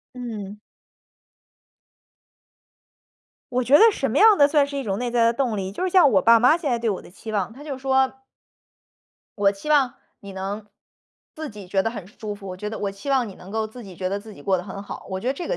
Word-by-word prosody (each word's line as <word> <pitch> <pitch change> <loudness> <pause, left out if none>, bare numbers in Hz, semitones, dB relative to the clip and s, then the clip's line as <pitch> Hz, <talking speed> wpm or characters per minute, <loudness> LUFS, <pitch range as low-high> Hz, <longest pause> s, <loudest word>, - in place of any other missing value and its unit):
嗯。 210 -5 -6 2.9
我 250 +1 +1
觉 260 +4 +2
得 - - +6
什 270 - -2
么 265 - -2
样 430 +1 +7
的 285 0 +6
算 290 -2 +3
是 280 0 -5
一 - - -2
种 200 -3 -2
内 245 -1 -2
在 235 -1 +3
的 230 - +3
动 235 -5 -1
力， 190 0 -3
就 360 - -5
是 370 - 0
像 345 -7 +6
我 190 -4 +3
爸 230 0 +6
妈 250 +7 +5
现 310 -6 -3
在 240 - +1
对 230 -1 -1
我 195 - -2
的 - - -14
期 215 +3 -9
望， 200 -1 -1
他 275 +5 -12
就 285 -3 -5
说 265 0 +2 1.3
我 200 -1 +4
期 200 +10 -9
望 275 -4 +3 0.3
你 200 -1 -10
能 200 +2 -5 0.7
自 310 -1 -6
己 205 -3 -10
觉 190 +1 +1
得 225 - -1
很 205 -6 -8
舒 210 0 -7
服， 200 -1 -12
我 185 - -5
觉 210 +2 -5
得 220 - -6
我 200 -1 -2
期 200 +8 -10
望 260 -4 +2
你 190 - -10
能 185 - -12
够 220 0 -1
自 240 +3 -11
己 190 -4 -11
觉 185 - -3
得 200 +1 -3
自 215 -1 -12
己 145 - -14
过 190 +2 +2
得 - - -5
很 200 +1 -8
好， - - -9
我 190 0 -3
觉 235 - -7
得 260 - +2
这 340 +5 -6
个 - - 0
225 Hz, 265 characters per minute, -23 LUFS, 200-265 Hz, 2.9 s, 样